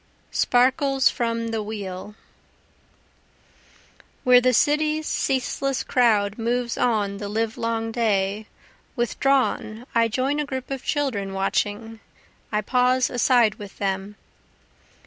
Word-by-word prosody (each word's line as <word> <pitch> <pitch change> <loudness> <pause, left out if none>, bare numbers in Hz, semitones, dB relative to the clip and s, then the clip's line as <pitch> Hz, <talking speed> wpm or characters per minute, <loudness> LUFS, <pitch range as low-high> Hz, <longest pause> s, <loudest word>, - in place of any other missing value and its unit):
Sparkles 265 +2 +3
from 230 -1 -2
the 225 -1 -2
Wheel 205 -1 -6 2.1
Where 250 -1 +6
the 255 +1 +3
city's 305 +4 +2
ceaseless 270 0 -1
crowd 215 -4 +2
moves 235 +1 -1
on 210 -4 0
the 205 0 -5
livelong 225 +1 -2
day, 210 -2 0 0.5
Withdrawn 245 -2 0
I 230 0 +3
join 265 +6 -1
a 300 - -1
group 260 -1 -5
of 270 -2 -4
children 230 -10 -1
watching, 205 +3 -2 0.5
I 210 0 +1
pause 250 +3 +2
aside 240 -3 +3
with 205 -2 -10
them. 195 +1 -3
230 Hz, 110 wpm, -23 LUFS, 210-255 Hz, 2.1 s, Where